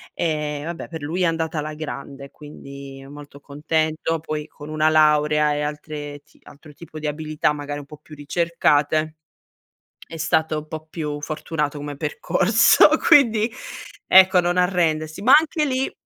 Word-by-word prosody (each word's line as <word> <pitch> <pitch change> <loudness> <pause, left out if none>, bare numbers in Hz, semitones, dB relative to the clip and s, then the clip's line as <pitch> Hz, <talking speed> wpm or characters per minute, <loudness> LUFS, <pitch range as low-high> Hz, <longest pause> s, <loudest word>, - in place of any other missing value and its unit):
e 150 -3 -2
vabbè 170 0 -6
per 160 -3 -8
lui 165 +5 -3
è - - +3
andata 160 -1 -1
alla 150 +1 -5
grande 140 -2 -8
quindi 140 -2 -11
molto 145 0 -12
contento 155 +3 -2
poi 155 -1 -5
con 145 - -12
una 155 0 +1
laurea 150 -1 +3
e 145 - -2
altre 150 -1 -6
ti - - -27
altro 150 +1 -16
tipo 155 0 -12
di 155 - -7
abilità, 150 0 -1
magari 145 0 -6
un 145 - -9
po' 150 +1 -13
più 150 - -14
ricercate 155 0 0 0.9
è 165 - -9
stato 160 -1 0
un 150 0 -9
po' 155 0 -7
più 150 -2 -5
fortunato 150 0 -3
come 145 0 -7
percorso, 195 - +3 0.2
quindi 225 -5 +5 0.6
ecco 190 0 +6
non 175 +1 -1
arrendersi. 165 -3 0
Ma 255 - +4
anche 310 0 +1
lì 265 -2 -1
155 Hz, 155 wpm, -22 LUFS, 145-165 Hz, 0.9 s, ecco